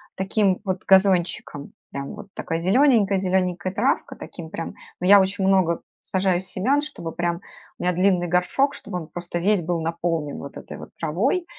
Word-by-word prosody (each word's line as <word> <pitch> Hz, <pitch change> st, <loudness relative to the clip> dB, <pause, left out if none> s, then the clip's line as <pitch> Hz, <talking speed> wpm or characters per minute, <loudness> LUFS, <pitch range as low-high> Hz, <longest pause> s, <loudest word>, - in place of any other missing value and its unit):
таким 195 Hz, 0 st, +1 dB
вот 185 Hz, -1 st, -2 dB
газончиком, 185 Hz, -6 st, +2 dB, 0.2 s
прям 140 Hz, 0 st, -5 dB
вот 210 Hz, -1 st, -10 dB
такой 165 Hz, -1 st, -3 dB
зелененькой 205 Hz, 0 st, +4 dB
зелененькой 185 Hz, -1 st, 0 dB
травкой, 245 Hz, +8 st, 0 dB
таким 160 Hz, -3 st, -9 dB
прям. 165 Hz, -, -5 dB, 0.3 s
Но 180 Hz, -, -1 dB
я 200 Hz, 0 st, +9 dB
очень 190 Hz, 0 st, 0 dB
много 185 Hz, -4 st, +3 dB, 0.2 s
сажаю 190 Hz, -2 st, +1 dB
семян, 215 Hz, +10 st, 0 dB
чтобы 280 Hz, -, -6 dB
прям 175 Hz, +1 st, -2 dB, 0.4 s
у -, -, -7 dB
меня 180 Hz, 0 st, +2 dB
длинный 180 Hz, 0 st, +2 dB
горшок, 180 Hz, -, +1 dB
чтобы 180 Hz, -, -6 dB
он 160 Hz, -, -8 dB
просто 175 Hz, 0 st, -5 dB
весь 195 Hz, +2 st, +2 dB
был 170 Hz, +1 st, -1 dB
наполнен 165 Hz, -2 st, -2 dB
вот 140 Hz, -, -9 dB
этой -, -, -9 dB
вот -, -, -10 dB
травой. 205 Hz, -, 0 dB
185 Hz, 170 wpm, -23 LUFS, 170-200 Hz, 0.4 s, я